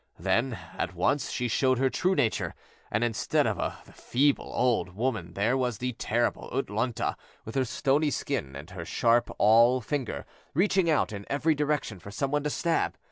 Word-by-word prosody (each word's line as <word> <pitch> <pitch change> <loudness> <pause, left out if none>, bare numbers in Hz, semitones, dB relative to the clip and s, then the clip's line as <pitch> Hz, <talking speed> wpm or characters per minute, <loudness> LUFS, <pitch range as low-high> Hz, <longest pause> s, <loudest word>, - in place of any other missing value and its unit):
Then, 115 +8 0 0.2
at - - -2
once, 145 -2 +1
she 125 - -1
showed 130 +2 +2
her 130 +1 +2
true 185 +1 +1
nature, 120 -7 0 0.3
and 105 +3 0
instead 115 -3 +1
of - - 0 0.3
the - - -17
feeble 140 +3 +1
old 115 -7 +1
woman 105 -7 -2
there 110 +6 +2
was 125 -4 0
the 125 +2 -2
terrible 120 +1 -1
U'tlûñ'ta 120 -2 -1 0.3
with 110 - -7
her 135 -1 +1
stony 145 +5 +1
skin, 120 - -3
and 75 +6 -9
her 90 -2 -6
sharp 115 +7 +2
awl 115 +4 +6
finger 120 - -3 0.3
reaching 190 0 +3
out 150 -7 +2
in 100 -1 -7
every 155 +3 +2
direction 145 -8 -1
for 95 - -10
some 135 +7 -2
one 145 0 +1
to 150 - -1
stab. 165 +3 0
125 Hz, 180 wpm, -28 LUFS, 110-140 Hz, 0.3 s, awl